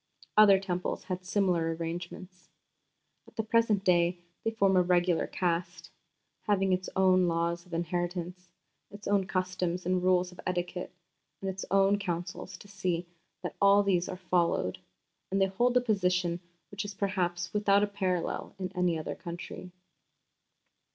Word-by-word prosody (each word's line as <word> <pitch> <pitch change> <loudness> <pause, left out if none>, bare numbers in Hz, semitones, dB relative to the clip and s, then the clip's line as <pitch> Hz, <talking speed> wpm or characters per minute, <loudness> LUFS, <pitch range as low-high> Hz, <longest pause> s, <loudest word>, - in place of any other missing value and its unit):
Other 205 -2 +7
Temples 180 -2 -3
had 185 -1 -4
similar 180 -4 +1
arrangements.... 175 +2 -7 0.8
At - - -18
the 220 - -1
present 220 -2 +2
day 175 -1 +3 0.3
they - - +1
form 200 -4 +2
a 185 - +6
regular 175 -1 +2
Caste, 175 0 -2 0.6
having 195 -2 +2
its 185 0 -1
own 185 -1 +4
laws 170 +1 -1
of 175 - -14
inheritance, 175 +1 -3 0.4
its 205 +1 -10
own 200 -2 +2
customs 185 -1 -2
and 180 0 +1
rules 180 0 +2
of 180 - -16
etiquette, 180 0 -3 0.5
and 195 0 -2
its 190 0 -6
own 195 +1 +4
councils 180 0 -4
to - - -14
see 185 -3 -2 0.4
that - - -4
all 200 +1 +6
these 180 -3 +1
are 185 - -5
followed, 175 - 0 0.5
and 195 - 0
they 195 - +5
hold 240 +6 +2
a - - +4
position 180 -6 +1 0.3
which 200 0 -4
is 205 -1 -7
perhaps 180 -3 -1
without 205 -1 +4
a - - +2
parallel 185 -4 -2
in 185 -1 -4
any 180 -2 +1
other 155 - -4
country. 175 +1 -8
185 Hz, 150 wpm, -30 LUFS, 175-195 Hz, 0.8 s, Other